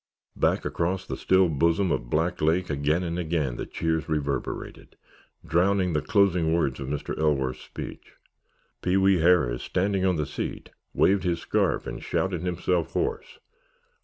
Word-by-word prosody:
Back - - +1
across 95 +2 -1
the - - -4
still 95 0 +3
bosom 85 +5 +1
of - - -2
Black 80 +4 0
Lake, 85 +3 +1
again 75 +5 +1
and 85 0 -3
again, 80 -7 -1
the - - -5
cheers 80 -1 -2
reverberated, 70 -3 -3 0.5
drowning 90 +2 +2
the 75 - +1
closing 90 -2 +2
words 70 -6 0
of 65 - -5
Mr. 70 +1 -3
Ellsworth's 70 -5 0
speech. - - -9 0.7
Pee 90 +2 +1
wee 95 -1 +4
Harris, 80 -8 +3
standing 95 +1 0
on 95 -1 +2
the 75 -2 -1
seat, - - -5 0.2
waved 100 0 +4
his 85 -2 0
scarf - - 0
and - - -6
shouted 95 -3 -1
himself 90 -1 -1
hoarse. 445 +3 -2
85 Hz, 155 wpm, -26 LUFS, 75-95 Hz, 0.7 s, wee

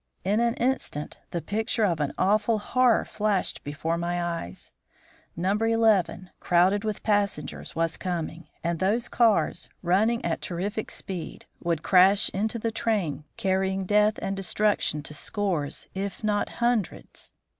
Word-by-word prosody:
In 205 +3 +2
an 235 0 +2
instant 240 - -2
the 170 - -3
picture 220 +2 0
of 175 -6 +2
an 145 -2 0
awful 210 +3 +3
horror 245 +3 +3
flashed 205 -3 0
before 160 +4 -2
my 175 +1 -1 0.2
eyes. 90 +2 -6 0.6
No. 180 +3 0
11, 215 -4 +2
crowded 185 +4 +3
with 215 -2 -3
passengers, 205 -2 -1
was 165 0 0
coming, 170 -2 -4 0.2
and 170 -1 -1
those 215 +6 +1
cars, 230 -3 +2
running 215 +7 +2
at 170 - -1
terrific 200 +5 -3
speed, 185 -4 -6 0.2
would 165 -3 0
crash 195 +2 +5
into 215 +4 -1
the 230 0 -2
train, 175 -11 -1
carrying 190 0 0
death 210 +2 +3
and 195 - -1
destruction 195 -5 +1
to 150 - -7
scores, 170 -5 -2
if 195 +3 -4
not 210 -1 +1
hundreds. 235 -5 -2
195 Hz, 140 wpm, -26 LUFS, 170-215 Hz, 0.6 s, crash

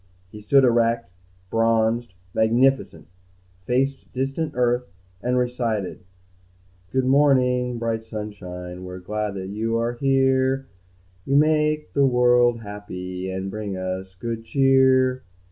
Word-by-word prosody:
He 105 - -10
stood 135 +6 +4
erect, 115 -3 +2 0.4
bronzed, 115 -1 +1 0.2
magnificent, 115 -6 +2 0.6
faced 135 +2 -1
distant 135 +4 -2
Earth, 125 0 +1 0.3
and 125 +2 0
recited: 120 -7 -2 0.9
"Good 130 -1 +1
morning, 125 -3 +3
bright 115 -1 -2
sunshine, 90 -5 -7
We're 90 0 -7
glad 105 +2 -3
you 105 +5 -2
are 115 +1 -1
here. 135 +1 +2 0.6
You 135 - 0
make 150 -6 +2
the 140 -1 +4
world 125 -1 +3
happy, 95 -3 -6
And 95 +1 -4
bring 105 -2 -4
us 95 0 -5
good 115 +4 -5
cheer." 130 0 +3
120 Hz, 110 wpm, -23 LUFS, 105-130 Hz, 0.9 s, stood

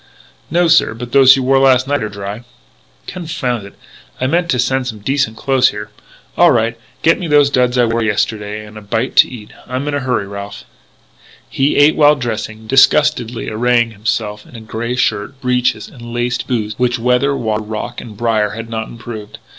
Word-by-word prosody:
"No, 175 +2 +2
sir. 165 -8 +3
But 120 +1 -8
those 135 0 +7
you 135 - -2
wore 135 +1 +3
last 130 -1 +4
night 145 0 0
are 110 - -3
dry 100 +3 -7 0.3
" - - -36
"Confound 130 - -4
it! - - -16 0.4
I - - -1
meant 175 +6 0
to 130 - +1
send 125 +1 0
some 110 -3 -5
decent 110 +1 -1
clothes 130 -2 +3
here 105 0 -7 0.4
All - - +6
right; 115 +1 +1 0.3
get 165 - +4
me 175 - -4
those 145 -2 +4
duds 125 -1 +1
I 120 - +4
wore 115 0 0
yesterday 105 -1 -2
and 105 0 -11
a - - -14
bite 115 +5 -2
to - - +7
eat! 110 -4 -10 0.2
I'm 130 +3 -3
in 145 - -2
a 145 - 0
hurry, 125 -6 -1
Ralph 100 +1 -8 0.5
" - - -33 0.3
He 135 +2 +1
ate 145 +2 +5
while 150 -1 +5
dressing, 110 -3 -5
disgustedly 130 -1 +3
arraying 120 +1 +1
himself 105 -1 -3
in - - -17
the 115 - -9
grey 115 +2 -4
shirt, 110 +1 -1
breeches, 125 -4 0
and 120 -2 -11
laced 120 +1 -2
boots 110 -4 -2
which 125 -1 +1
weather, 125 +4 +1
water, 110 -2 -1
rock, 110 +3 -5
and 110 -3 -11
brier 110 -2 0
had 115 0 -7
not 110 -1 -3
improved. 115 -3 -9
120 Hz, 200 wpm, -16 LUFS, 110-130 Hz, 0.5 s, those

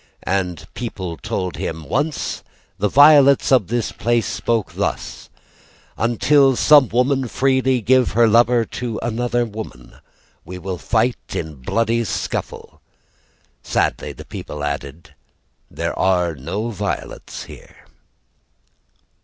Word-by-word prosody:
The 90 -4 -2
people 95 -8 -5
told 95 -3 -4
him: 80 -1 -5
"Once 150 +4 -2 0.4
the 105 +1 +1
violets 140 0 +6
of 125 -9 +4
this 120 -1 -1
place 120 0 0
spoke 110 +1 -2
thus: - - -4 0.7
"'Until 135 +4 +3
some 145 0 +6
woman 130 +2 +1
freely 130 0 +1
give 130 +3 +3
her 115 +1 +5
lover 120 +1 +4
"'To 120 0 -5
another 120 +1 0
woman 105 - -9 0.5
"'We 90 +2 -8
will 90 0 -5
fight 115 0 -1
in 80 -1 -4
bloody 115 - 0
scuffle.'" 110 - -5 0.8
Sadly - - -1
the - - -11
people 75 -1 -7
added: 70 +2 -5 0.6
"There - - -3
are 90 -3 +2
no 95 - -4
violets 100 -2 -5
here." - - -15
115 Hz, 115 wpm, -20 LUFS, 95-125 Hz, 0.8 s, violets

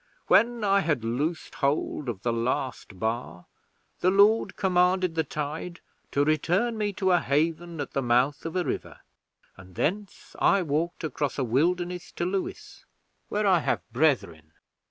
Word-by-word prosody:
When 235 -1 +3
I 200 -1 +4
had 155 - 0
loosed 145 +9 -2
hold 140 -1 -1
of 100 -5 -5
the 120 - +1
last 115 -3 -2
bar, 110 -7 -3 0.5
the 180 - +3
Lord 205 +4 +4
commanded 180 -1 +2
the 160 0 +1
tide 155 +4 -5 0.3
to 140 - +1
return 175 +10 +1
me 210 -1 -1
to 190 -1 +1
a 175 - +5
haven 165 +3 -1
at 145 - -4
the 135 - -1
mouth 125 +4 +2
of 165 +1 -5
a 180 - +1
river, - - -5 0.6
and 95 -1 -14
thence 200 - -3
I 195 -2 +4
walked 165 +3 -2
across 145 -2 -2
a 135 - 0
wilderness 175 +8 0
to 175 - -2
Lewes, 190 +1 -4 0.5
where 210 0 0
I 185 -3 +5
have 95 - -2
brethren. 100 - 0
160 Hz, 155 wpm, -27 LUFS, 130-180 Hz, 0.6 s, a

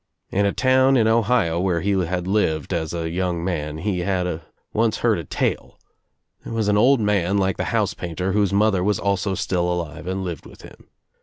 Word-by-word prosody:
In 100 +1 +2
a - - +1
town 130 +2 +3
in 110 -2 +3
Ohio 110 -7 +2
where 90 -2 0
he 100 +4 0
had 90 -2 -1
lived 95 -5 0
as 80 -2 -2
a 85 -1 -3
young 90 -1 -2
man 75 -4 -3
he 95 +2 -2
had 90 -3 -1 0.3
once 110 0 +1
heard 110 -6 +3
a - - -5
tale. - - -2 0.7
There - - -7
was 110 -2 0
an 105 - +3
old 125 +5 +4
man 100 -3 +1
like 95 -1 0
the - - -2
house - - 0
painter 90 +2 -3
whose 100 -1 +1
mother 100 -2 +2
was 105 0 +1
also 100 -1 -1
still 90 -1 -1
alive 85 -2 -4
and 95 +1 -2
lived 85 -6 -6
with - - -15
him. - - -15
95 Hz, 205 wpm, -22 LUFS, 85-105 Hz, 0.7 s, old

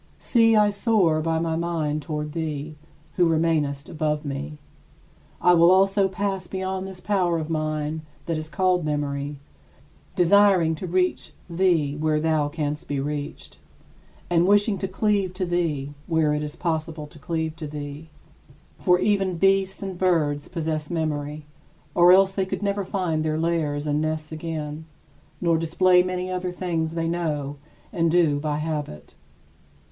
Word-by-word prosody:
See, 225 -2 +3
I 210 -1 +4
soar 200 -7 +2
by 165 0 0
my 165 0 -1
mind 160 -3 -1
toward 150 0 -4
thee, 155 -1 -4 0.4
who 175 -2 +4
remainest 155 -4 0
above 155 -1 -2
me. 145 +2 -5 0.8
I 180 - +5
will 170 0 +6
also 195 +1 +4
pass 190 -1 -3
beyond 190 0 -3
this 190 -1 -9
power 180 -4 +1
of 160 0 -4
mine 155 0 -2 0.2
that 165 - -1
is 155 0 -5
called 185 0 +1
memory, 145 -1 -2 0.8
desiring 185 -2 +5
to 170 +4 -5
reach 180 +1 0
thee 170 -5 +1
where 155 0 +1
thou 155 -2 +1
canst 150 -1 -3
be 145 -1 -2
reached, 145 +1 -5 0.7
and 175 0 +3
wishing 205 0 +3
to 190 - -2
cleave 195 -1 0
to 185 0 -1
thee 160 -5 -1
where 160 -2 +2
it 150 - -1
is 150 +1 -5
possible 160 -2 -3
to 150 +1 -14
cleave 160 +1 -3
to 155 -2 -6
thee. 145 +1 -7 0.7
For 180 0 +4
even 195 -2 +1
beasts 195 +1 +2
and 190 -2 -5
birds 155 -6 +1
possess 155 -3 -3
memory, 150 -2 -3 0.5
or 175 +1 +6
else 190 +1 +6
they 195 -1 -1
could 195 - -4
never 200 0 0
find 180 -5 -1
their 155 0 0
lairs 160 -3 -1
and 150 0 0
nests 155 0 -3
again, 155 -1 -5 0.5
nor 170 -2 +2
display 180 +2 +4
many 185 0 -3
other 180 0 -2
things 165 -3 -2
they 165 -1 -1
know 150 -4 -2 0.4
and 165 -3 +2
do 160 -4 +3
by 150 0 -2
habit. 150 - -5
165 Hz, 155 wpm, -24 LUFS, 150-185 Hz, 0.8 s, will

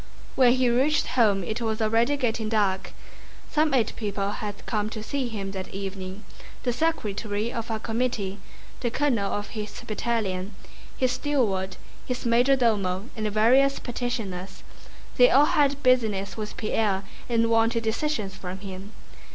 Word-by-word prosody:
When 250 -2 +5
he 255 -1 +2
reached 265 +6 +3
home 210 -6 +3
it 220 +6 -3
was 220 -1 -1
already 230 +5 +2
getting 225 -4 -1
dark. 200 -4 0 0.6
Some 310 0 +3
eight 230 -4 +1
people 200 -2 -2
had 205 -1 -6
come 210 -2 -1
to 215 -1 -6
see 270 +2 -2
him 200 -4 -4
that 190 -1 -5
evening: 195 0 -6 0.4
the 245 - +1
secretary 220 -7 -1
of 230 0 -4
a 220 -1 -1
committee, 220 -4 -2 0.4
the 240 - 0
colonel 240 -6 +1
of 205 0 -3
his 210 -2 -6
battalion, 210 -4 -2 0.4
his 255 -1 +2
steward, 240 -9 0 0.3
his 250 0 -4
major 245 +4 +4
domo, 210 -4 0
and 215 -2 -2
various 255 +6 +4
petitioners. 210 -7 -4 0.5
They 250 0 +8
all 280 +3 +6
had 285 -1 +2
business 215 -6 +2
with 215 -1 -6
Pierre 210 -3 0 0.3
and 230 -1 +2
wanted 230 +1 +3
decisions 220 -3 -1
from 185 -1 -6
him. 195 +1 -8
225 Hz, 150 wpm, -26 LUFS, 200-245 Hz, 0.6 s, They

